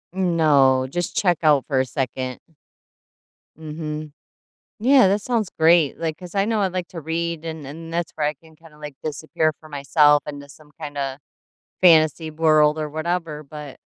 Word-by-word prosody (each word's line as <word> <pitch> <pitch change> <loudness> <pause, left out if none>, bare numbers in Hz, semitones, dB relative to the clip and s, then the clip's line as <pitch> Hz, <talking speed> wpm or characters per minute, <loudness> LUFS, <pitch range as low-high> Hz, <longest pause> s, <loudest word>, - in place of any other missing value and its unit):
Mm, 180 -3 0
no 135 -5 +4
just 175 +4 -3
check 175 -5 +2
out 145 -5 +4
for 135 -3 +1
a 130 - +1
second. 130 0 -4 1.2
Mhm. 155 -1 -6 0.7
Yeah, 255 -1 +5
that 200 +2 +1
sounds 230 -5 -1
great, 160 -2 +4
like, 160 -2 -3
'cause 180 +1 -11
I 195 0 +2
know 220 -2 0
I'd 190 -2 -1
like 180 -2 -3
to 165 - -8
read 165 +1 -3
and 160 -3 -6
and 165 +4 -9
that's 170 -1 -2
where 150 -2 0
I 150 - -1
can 160 +2 -21
kinda, 160 -1 -18
like, 150 -2 -9
disappear 155 +1 -1
for 155 - -15
myself 145 +1 +3
into 145 -1 -8
some 150 +1 -17
kinda 145 -3 -5 0.6
fantasy 160 -2 +4
world 155 -1 +3
or 155 -1 -3
whatever, 160 0 -3
but 150 -1 -10
155 Hz, 175 wpm, -22 LUFS, 145-170 Hz, 1.2 s, Yeah